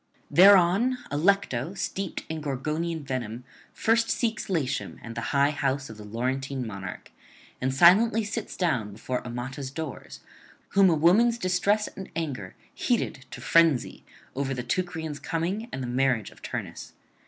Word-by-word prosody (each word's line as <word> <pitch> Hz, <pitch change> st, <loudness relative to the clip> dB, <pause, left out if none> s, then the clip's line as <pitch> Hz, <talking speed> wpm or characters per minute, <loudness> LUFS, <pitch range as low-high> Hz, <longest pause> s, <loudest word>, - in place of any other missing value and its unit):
Thereon 195 Hz, +6 st, +6 dB
Allecto, 165 Hz, -2 st, +1 dB
steeped 195 Hz, -2 st, -3 dB
in 160 Hz, -1 st, -4 dB
Gorgonian 155 Hz, +4 st, -2 dB
venom, 125 Hz, -3 st, -4 dB, 0.3 s
first 225 Hz, +1 st, +2 dB
seeks 225 Hz, -4 st, -1 dB
Latium 145 Hz, -8 st, -2 dB
and 115 Hz, -, -7 dB
the 115 Hz, -, -4 dB
high 140 Hz, +1 st, +3 dB
house 140 Hz, -3 st, -1 dB
of 110 Hz, -, -11 dB
the 105 Hz, -, -10 dB
Laurentine 130 Hz, +4 st, -3 dB
monarch, 100 Hz, -4 st, -7 dB, 0.5 s
and 130 Hz, 0 st, +1 dB
silently 210 Hz, -, +5 dB
sits 205 Hz, +1 st, -5 dB
down 125 Hz, -, 0 dB
before 125 Hz, +4 st, -4 dB
Amata's 125 Hz, +3 st, -5 dB
doors, 150 Hz, 0 st, -7 dB, 0.5 s
whom 195 Hz, -2 st, +5 dB
a 165 Hz, -, +3 dB
woman's 210 Hz, +10 st, +4 dB
distress 200 Hz, +2 st, +1 dB
and 190 Hz, -, -9 dB
anger 135 Hz, -, -4 dB, 0.2 s
heated 150 Hz, -, -1 dB
to -, -, -9 dB
frenzy 165 Hz, -6 st, +3 dB, 0.3 s
over 135 Hz, 0 st, -1 dB
the 125 Hz, -, -4 dB
Teucrians' 160 Hz, -4 st, -3 dB
coming 180 Hz, +8 st, -2 dB
and 130 Hz, -, -4 dB
the -, -, -3 dB
marriage 125 Hz, -3 st, +1 dB
of -, -, -19 dB
Turnus. -, -, -6 dB
150 Hz, 145 wpm, -27 LUFS, 130-185 Hz, 0.5 s, Thereon